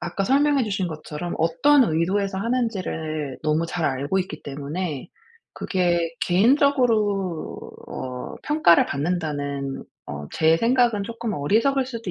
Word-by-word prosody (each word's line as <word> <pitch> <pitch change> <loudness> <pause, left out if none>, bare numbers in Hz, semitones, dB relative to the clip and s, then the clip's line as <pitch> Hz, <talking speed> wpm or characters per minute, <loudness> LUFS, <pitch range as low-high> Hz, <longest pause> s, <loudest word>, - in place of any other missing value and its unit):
아까 175 +3 -2
설명해 280 +1 +3
주신 195 -4 -2
것처럼 155 +1 -6
어떤 260 - +4
의도에서 190 +3 0
하는지를 185 - -2
너무 155 +2 +1
잘 165 0 -3
알고 140 +7 0
있기 180 -4 -6
때문에 145 +2 -5 0.5
그게 175 -4 0
'개인적으로 215 - +2 0.3
어 125 -1 -6
평가를 300 - +4
받는다는 145 -3 -3 0.2
어 75 0 -6
제 160 +1 +3
생각은 235 -2 +2
쪼끔 230 -1 -4
어리석을 230 - +1
수도 230 -6 -5
180 Hz, 290 characters per minute, -23 LUFS, 155-230 Hz, 0.5 s, 어떤